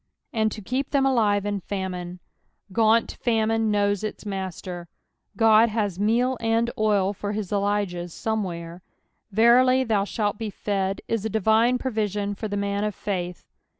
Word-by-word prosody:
" - - -51
And 220 -2 +1
to 215 - -8
keep 255 +7 -2
them 275 -1 +2
aline 210 -6 +2
in 205 -1 -1
famine.''^ 180 -2 -5 0.6
Gaunt 225 +1 +2
fomioo 225 -1 +2
knows 205 -2 +1
its 215 0 -5
master. 185 -3 -5 0.5
God 225 0 +6
has 205 -4 -2
meal 240 +5 +2
and 230 +1 +1
oil 205 -2 +2
for 205 +1 -4
his 210 -3 -4
Elijahs 200 -4 -1
somewhere. 180 -6 -4 0.3
" - - -49
Verily 250 +5 +5
thou 215 -5 +1
shalt 205 -1 -2
be 220 -2 -3
fed 195 -1 -2
" - - -49
is 230 -3 -1
a 220 - -1
divine 220 +4 +3
provision 210 -5 -2
for 215 +2 -5
the 205 -1 -3
man 200 0 -1
of 210 -2 -2
faith. 180 -3 -4
210 Hz, 165 wpm, -24 LUFS, 195-225 Hz, 0.6 s, God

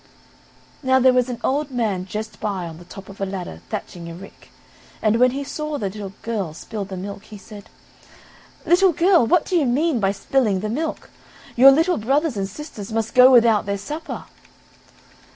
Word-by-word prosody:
Now 260 -2 +3
there 260 0 +5
was 250 0 +2
an 240 -2 -5
old 290 +2 0
man 215 -8 -2
just 215 +3 -6
by 195 -4 -3
on 160 -1 -10
the 175 - -13
top 195 +2 -11
of 195 0 -12
a - - +1
ladder 180 - -6
thatching 170 -1 -6
a 165 - -8
rick, 195 +3 -14 0.5
and 215 +1 +2
when 250 +1 +6
he 275 +3 -4
saw 300 +1 -4
the 200 -7 -3
little 200 -1 -7
girl 200 -9 -3
spill 210 +3 -6
the 190 -1 -7
milk, 200 +2 -7
he 215 - -11
said: 205 0 -13 1.0
"Little 360 +1 +4
girl, 340 -5 +4
what 350 +2 +3
do 370 - -2
you 305 -6 +3
mean 280 +2 +1
by 195 -2 +1
spilling 205 -1 0
the 215 - -3
milk, 305 +8 -4 0.4
your 260 +3 +8
little 325 +6 +3
brothers 275 +5 0
and 195 -1 -3
sisters 215 -4 -9
must 225 0 -2
go 255 0 +8
without 230 -5 +4
their 200 0 -1
supper." 305 - -6
225 Hz, 190 wpm, -21 LUFS, 195-275 Hz, 1.0 s, your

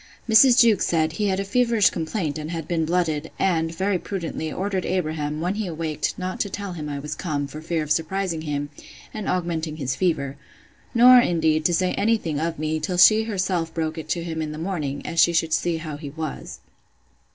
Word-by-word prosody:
Mrs. 240 +3 +6
Jewkes 230 -3 +4
said, 160 -2 +1
He 205 +6 -1
had 190 -1 0
a - - 0
feverish 230 0 +3
complaint, 160 -2 -3
and 155 +1 -6
had 165 -2 -5
been 165 -2 0
blooded; 160 -2 0
and, 165 -4 +1
very 190 +2 -1
prudently, 165 -5 -4
ordered 190 -1 -2
Abraham, 155 -4 -2
when 180 +3 0
he 210 -1 -3
awaked, 160 -2 -3
not 185 0 -4
to 200 - -1
tell 200 -1 -5
him 150 -3 -6
I 145 - -4
was 150 +2 -5
come, 150 -4 -3
for 150 +2 -9
fear 160 0 -1
of 150 - -6
surprising 170 0 -1
him, 145 -1 -3 0.4
and 215 -2 -4
augmenting 165 -3 -2
his 135 -2 -2
fever; 140 -6 -1 0.6
nor, 250 +1 +8
indeed, 160 -6 +1
to 175 - +3
say 185 +1 +1
any 225 +3 +2
thing 160 -8 -3
of 165 +1 -2
me, 155 +1 -1
till 175 +4 -3
she 215 +5 +6
herself 185 -6 -1
broke 160 -1 -2
it 160 - -9
to 170 - -1
him 160 -1 -4
in 155 -1 -3
the 150 - -7
morning, 155 -5 -3
as 165 - -2
she 170 +1 +5
should 165 -1 +1
see 170 0 +1
how 155 -2 -6
he 145 -1 -7
was. 155 0 -6
165 Hz, 210 wpm, -23 LUFS, 155-190 Hz, 0.6 s, nor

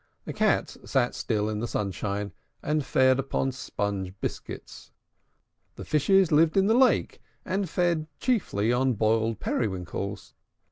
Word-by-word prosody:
The - - -5
Cats - - +1
sate 125 -2 +1
still 105 -2 -1
in 105 -1 -2
the 120 - -2
sunshine, 100 0 -3 0.3
and 150 0 0
fed 130 0 +3
upon 135 0 -1
sponge 100 -6 -4
biscuits. - - -7 0.8
The - - -8
Fishes 190 +4 +3
lived 155 +3 +4
in 195 - +5
the 220 - +4
lake, 255 +2 +3 0.2
and 190 -1 -1
fed 170 -2 0
chiefly 120 - +1
on 130 +1 +2
boiled 110 0 +1
periwinkles. 95 -3 -3
130 Hz, 135 wpm, -27 LUFS, 105-155 Hz, 0.8 s, in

